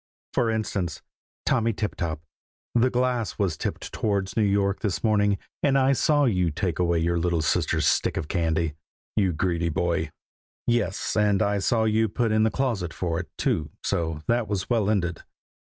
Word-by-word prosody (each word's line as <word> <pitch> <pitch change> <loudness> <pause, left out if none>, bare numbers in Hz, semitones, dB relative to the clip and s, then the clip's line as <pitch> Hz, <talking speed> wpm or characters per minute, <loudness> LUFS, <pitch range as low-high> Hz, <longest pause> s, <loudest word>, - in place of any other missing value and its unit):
For 115 - +2
instance, 100 -6 -2 0.4
Tommy 115 -2 +2
Tiptop, 85 -7 -3 0.5
the 120 +2 +4
glass 125 -3 0
was 95 -6 0
tipped - - -5
towards 100 -3 -1
New 110 - +2
York 100 -1 +2
this 100 -4 -2
morning, 105 -2 +3 0.2
and 135 -2 +3
I 135 0 +4
saw 145 +2 +3
you 90 -8 +2
take 85 +1 -2
away 85 -1 +2
your 85 +1 +1
little 85 -1 +1
sister's - - +1
stick - - +1
of 75 - -3
candy, 80 -3 0 0.4
you 100 -4 +3
greedy 85 0 0
boy! 85 +1 0 0.6
Yes, 115 -5 0
and 105 -2 +3
I 100 0 +1
saw 110 +3 +2
you 110 0 +2
put 115 +2 0
in 110 0 +3
the 110 - +4
closet 110 -9 -2
for 85 -2 -1
it, 90 - -6
too, 75 -2 0
so 80 -2 -1
that 120 -1 +1
was 100 +2 -3
well 110 -4 +2
ended. 90 -5 0
100 Hz, 175 wpm, -25 LUFS, 85-110 Hz, 0.6 s, the